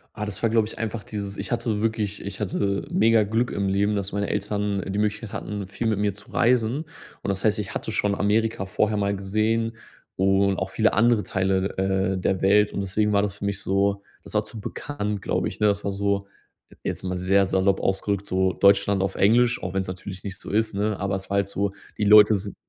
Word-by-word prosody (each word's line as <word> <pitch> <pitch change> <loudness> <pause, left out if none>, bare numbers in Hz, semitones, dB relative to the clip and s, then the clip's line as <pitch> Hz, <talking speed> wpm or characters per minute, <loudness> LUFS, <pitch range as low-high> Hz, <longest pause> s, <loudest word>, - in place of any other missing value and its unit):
Ah, 105 - -3
das 105 0 -4
war, 115 - +2
glaube 110 -1 +2
ich - - -9
einfach 115 -1 -3
dieses 100 -2 -6
ich 100 - -5
hatte 115 -3 -1
wirklich 110 -2 -1
ich 100 - -6
hatte 100 -1 -1
mega 115 -1 +4
Glück 115 +4 0
im 100 -1 -1
Leben, 100 +2 +1
dass 100 -1 -2
meine 100 0 -1
Eltern 105 -1 -1
die 100 +1 -3
Möglichkeit 105 0 -1
hatten, 105 -2 -5
viel 115 +4 -5
mit 105 -2 +1
mir 105 -1 +1
zu 100 +1 -15
reisen. 125 +5 +2 0.4
Und - - -4
das 100 0 -2
heißt, 105 0 +2
ich 105 - -5
hatte - - -3
schon 105 -2 0
Amerika 105 +1 +1
vorher 105 +2 0
mal 100 0 0
gesehen 110 +4 0 0.4
und 95 0 +2
auch 95 0 -3
viele 110 0 +2
andere 115 0 +3
Teile, 95 0 -1
äh, 95 0 +1
der 95 +1 0
Welt 105 +2 +4
und 100 - -2
deswegen 105 +2 0
war 100 - +4
das 100 -1 -2
für 100 - -6
mich 100 -1 -2
so 100 +1 0 0.2
das - - -10
war 105 0 +2
zu 110 - -10
bekannt, 105 -4 -4
glaube - - -1
ich, - - -7
ne? 105 - +4
Das 100 0 0
war 100 - -1
so 100 0 -1 0.6
jetzt - - -4
mal 90 -1 -2
sehr 95 +2 +3
salopp 95 0 +2
ausgerückt, 100 +1 -1
so 95 0 +1
Deutschland 100 +2 +4
auf 95 0 -1
Englisch, 120 +4 +3
auch 90 0 -3
wenn 95 - +1
es 95 - -6
natürlich 95 +1 -7
nicht 95 -2 -6
so - - -9
ist, 110 0 0
ne? 105 0 -1
Aber 100 0 -1
es 95 0 -7
war 100 - -1
halt 100 -1 +2
so, 100 0 -1 0.3
die - - -1
Leute 105 +1 +8
sind 100 0 -5
100 Hz, 230 wpm, -24 LUFS, 95-105 Hz, 0.6 s, Leute